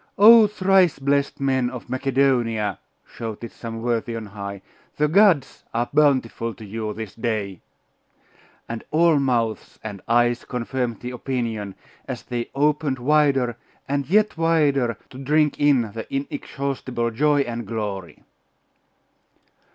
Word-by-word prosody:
'Oh, 220 +1 +9
thrice 190 -4 +3
blest 140 0 0
men 130 -2 +1
of 125 -1 -8
Macedonia!' 125 -5 +1 0.3
shouted 115 0 -7
some 115 -1 -7
worthy 120 -1 -1
on 115 -1 -5
high, 100 -1 -7 0.3
'the 150 - +3
gods 175 -6 +3
are 120 +1 -1
bountiful 130 -6 +2
to 110 - -11
you 110 +1 -4
this 110 -2 -7
day!' 105 -5 -3 1.1
And 115 -1 -5
all 160 -1 +4
mouths 120 -5 -1
and 100 -3 -7
eyes 120 +1 +2
confirmed 125 -2 -3
the 125 - -5
opinion, 115 -6 -3 0.3
as - - -5
they 120 -1 -4
opened 150 -1 +1
wider 135 -3 +2 0.3
and 140 0 -2
yet 210 +3 +3
wider 145 -8 +2
to 130 - -10
drink 150 +2 +1
in 135 -7 +3
the 110 +1 -7
inexhaustible 135 -3 -3
joy 145 +4 +2
and 120 -4 -4
glory. 105 -5 -5
125 Hz, 130 wpm, -23 LUFS, 115-145 Hz, 1.1 s, Oh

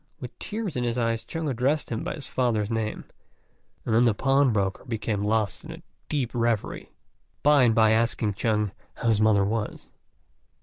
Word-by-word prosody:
With - - -9
tears 215 -4 -4
in 125 - -1
his 120 0 -1
eyes 115 -1 0
Chung 165 -1 -4
addressed 135 +3 0
him 115 - -2
by - - -3
his 150 - -7
father's 115 -4 0
name, 110 -1 -2 0.8
and 110 - 0
then 120 +2 +5
the 115 -3 +3
pawnbroker 125 -8 +2
became 110 -4 -2
lost 105 0 0
in 160 - -9
a 165 +1 -10 0.3
deep 135 -6 -1
reverie, 115 -3 -1 0.5
by 145 -1 +6
and 115 -2 +3
by 110 -1 +5
asking 110 -1 +1
Chung 105 0 0 0.2
how 115 - -1
his 110 -2 +3
mother 105 -2 +4
was. 105 +1 -3
115 Hz, 175 wpm, -26 LUFS, 110-130 Hz, 0.8 s, by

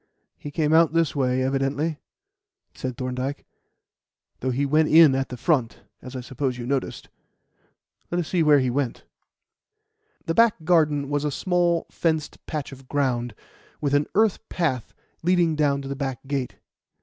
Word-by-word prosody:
"He 145 - -8
came 150 +1 0
out 165 -1 +5
this 165 -2 +1
way, 130 -2 +1
evidently," 140 +4 -1 0.7
said 130 -2 -5
Thorndyke, 130 +2 -4 0.9
"though 130 - -2
he 135 +3 0
went 155 +2 +3
in 160 -3 +7
at 135 0 -1
the 125 - -6
front, 130 -5 0 0.2
as 130 0 -9
I 130 - -4
suppose 130 0 -3
you 120 - -6
noticed. 135 0 -3 1.0
Let 175 - -2
us 170 - -2
see 180 - +1
where 150 -2 +6
he 130 -2 +1
went." 130 -2 -2 1.2
The 165 - 0
back 225 -4 +3
garden 150 -4 +2
was 145 0 0
a 150 - 0
small, 175 +2 +1
fenced 160 -3 -2
patch 150 -3 -4
of 135 -1 -13
ground, 125 -5 -1 0.4
with 145 -2 -1
an 145 +1 +2
earth 215 -1 +3
path 130 -9 -1 0.3
leading 175 -2 +2
down 140 -2 +1
to - - -7
the 140 - -4
back 135 -2 -4
gate. 135 -3 -3
145 Hz, 160 wpm, -24 LUFS, 130-160 Hz, 1.2 s, in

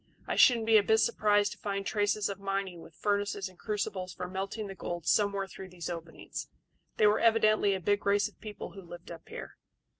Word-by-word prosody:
I - - -2
shouldn't 235 -3 +6
be 225 0 +6
a - - +6
bit 220 +2 +3
surprised 205 -2 +3
to - - -8
find 200 -1 -3
traces 205 0 +1
of 200 -1 -5
mining 195 -3 -3
with 165 - -14
furnaces 205 -1 -1
and 185 -1 -16
crucibles 200 -3 -3
for 180 +1 -5
melting 195 +4 -4
the 195 - -6
gold 175 -3 -5
somewhere 200 -2 +2
through 190 0 -10
these 175 -1 -6
openings. 165 -1 -7 0.5
They - - +5
were 210 +1 +5
evidently 215 -3 +4
a - - -3
big 205 +3 +1
race 200 +1 +3
of 215 - -18
people 210 -2 -7
who 195 - -10
lived 175 -1 -11
up 165 -1 -11
here." - - -8
200 Hz, 210 wpm, -30 LUFS, 185-210 Hz, 0.5 s, shouldn't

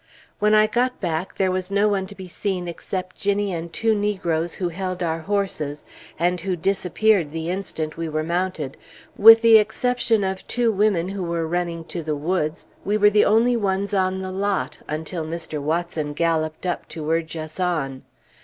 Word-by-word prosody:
When 210 +1 +4
I 215 0 +6
got 245 +3 0
back, 170 0 -3
there 190 -1 +2
was 185 0 -2
no 200 +1 +3
one 195 -2 0
to 200 - -11
be 190 -2 -9
seen 180 0 -3
except 185 +2 -5
Ginnie 200 -1 0
and 170 0 -5
two 225 +4 +1
negroes 185 -6 -1
who 180 -2 -2
held 185 +1 -4
our 165 -1 -1
horses, 160 -6 -2 0.3
and 175 +1 +1
who 185 0 -1
disappeared 190 0 +1
the 165 +2 -3
instant 165 -5 -4
we 165 -1 -3
were 155 0 -1
mounted; 170 -4 -2 0.4
with 225 +2 +9
the 225 -1 +8
exception 225 0 +1
of 190 0 -3
two 240 -2 +1
women 195 -4 +1
who 195 0 -4
were 170 -1 -2
running 170 -1 -2
to 175 - -3
the 155 -1 -2
woods, 155 +1 -2 0.2
we 205 +2 +1
were 210 0 +5
the 210 0 +4
only 230 +4 +4
ones 200 -2 -1
on 190 -1 +1
the 185 - -4
lot, 195 +1 -1
until 160 +2 -4
Mr. 160 -1 -4
Watson 155 -1 -2
galloped 160 +1 -1
up 180 - -2
to 155 -1 -7
urge 165 0 -1
us 155 +2 -7
on. 155 -8 -1
185 Hz, 185 wpm, -23 LUFS, 165-200 Hz, 0.4 s, with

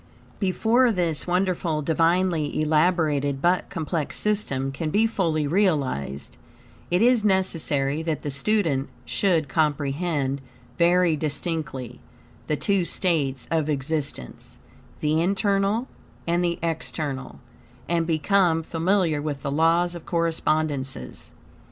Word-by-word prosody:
Before 225 +6 +3
this 175 -6 -1
wonderful, 175 -4 0
divinely 165 0 +1
elaborated, 155 -3 +2
but 175 +5 +1
complex 160 -3 -3
system 140 -11 -1
can 155 +3 -3
be 210 +7 +3
fully 165 -9 0
realized, 140 - 0 0.5
it 180 +4 +2
is 245 -2 +4
necessary 160 -7 +1
that 160 -2 -3
the 145 - -3
student 145 -2 0 0.2
should 170 -7 +1
comprehend, 145 -1 0 0.4
very 175 -1 +4
distinctly, 150 -4 -4 0.5
the 150 - +1
two 195 +4 +1
states 155 -7 -1
of 160 -2 +1
existence, 145 - -4 0.4
the 155 +1 +2
internal 200 +5 +1 0.4
and 170 +1 +1
the 170 -1 0
external, 150 - -3 0.5
and 170 -1 0
become 165 0 +2
familiar 165 -1 +1
with 145 -2 -4
the 140 - -2
laws 165 +4 +2
of 170 -2 -10
correspondences. 155 - -1
160 Hz, 110 wpm, -24 LUFS, 145-180 Hz, 0.5 s, is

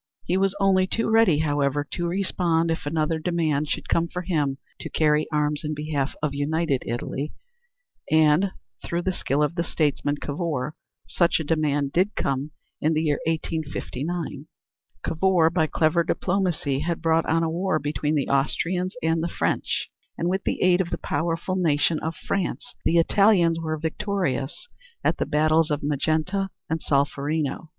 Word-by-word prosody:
He 175 - 0
was 195 +1 +2
only 190 -1 +3
too 225 +3 -1
ready, 225 -8 +5
however, 145 -1 +1
to 175 -1 -2
respond 170 -3 +1
if 165 -2 -3
another 160 +1 0
demand 155 -3 0
should - - -3
come 170 0 +2
for 180 +2 -5
him 150 -6 0 0.2
to - - -6
carry 150 -1 +2
arms 150 0 +1
in 155 0 -2
behalf 145 -2 -2
of 150 -2 0
United 145 -1 0
Italy, 130 +5 -3 0.8
and 155 +4 +4 0.3
through 170 +1 -2
the 190 - +1
skill 150 -4 0
of 150 - 0
the 170 -1 -1
statesman, 145 -3 0
Cavour, 150 -2 -3 0.3
such 170 -1 +2
a - - -2
demand 145 -2 0
did 185 +6 +1
come 135 +2 -1 0.3
in 155 +2 +2
the 155 - +1
year 150 -2 +1
1859. 160 0 -3 0.6
Cavour, 165 -1 +3
by 165 -2 +2
clever 160 +2 +2
diplomacy, 175 -6 0
had 170 +2 -2
brought 165 0 +2
on 165 +1 +2
a - - +1
war 185 +1 0
between 150 0 -1
the 140 - 0
Austrians 175 +7 0
and 160 0 +2
the 170 - 0
French - - -1 0.3
and 170 - -1
with 190 +2 -1
the - - 0
aid 180 0 +5
of 175 - -3
the - - -2
powerful 165 +4 -2
nation 160 -3 +2
of 160 +1 -3
France 195 -2 -3
the 170 - +3
Italians 170 -1 +4
were 155 -1 -2
victorious 160 - -2 0.4
at - - +2
the - - -1
battles 155 +1 +3
of 150 -1 -1
Magenta 155 +7 0 0.2
and 160 0 0
Solferino. 145 +2 0
160 Hz, 165 wpm, -25 LUFS, 150-175 Hz, 0.8 s, ready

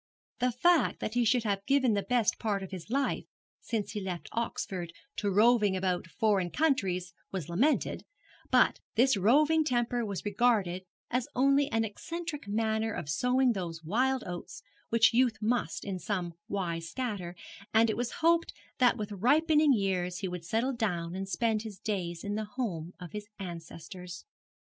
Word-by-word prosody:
The 250 +1 +2
fact 335 +8 +3
that 215 - -3
he 245 0 +2
should 240 +1 +3
have 200 -2 -1
given 265 -4 +3
the 200 - +1
best 230 +2 +1
part 205 -3 -1
of 190 - -8
his 185 0 -7
life 275 +3 0 0.3
since 215 -4 -3
he 210 - -4
left 185 -3 -5
Oxford 185 -6 -3 0.2
to 205 - 0
roving 210 -1 +4
about 185 -2 -1
foreign 195 -1 +1
countries 185 - 0 0.2
was 185 -6 -4
lamented; 250 - +1 0.5
but - - +4 0.2
this 255 +3 +4
roving 295 - +4
temper 240 -3 0
was 200 -3 -4
regarded 205 -4 +1 0.3
as 250 0 0
only 275 +2 +4
an 225 0 +2
eccentric 315 +6 -5
manner 220 +1 0
of 155 -8 -5
sowing 250 - +3
those 170 -4 -5
wild 255 +9 +1
oats 175 -1 -7 0.3
which 230 0 +5
youth 240 -2 +3
must 235 +3 -1
in 190 -3 -3
some 180 -3 -2
wise 170 -4 -3
scatter; 195 -5 -4 0.4
and 225 +1 +5
it 220 - 0
was 245 +1 -2
hoped 335 0 +3 0.3
that 245 -1 +4
with 210 -1 -4
ripening 300 - +4
years 185 -5 0
he 195 - -3
would 180 -1 -5
settle 225 +10 0
down 175 -8 -2
and 195 +1 -4
spend 220 +1 +1
his 215 -3 -8
days 175 -6 -3
in 205 - -3
the 215 +1 -2
home 205 -8 -4
of 180 -2 -8
his 210 0 -6
ancestors. 175 0 -8
215 Hz, 165 wpm, -30 LUFS, 185-245 Hz, 0.5 s, which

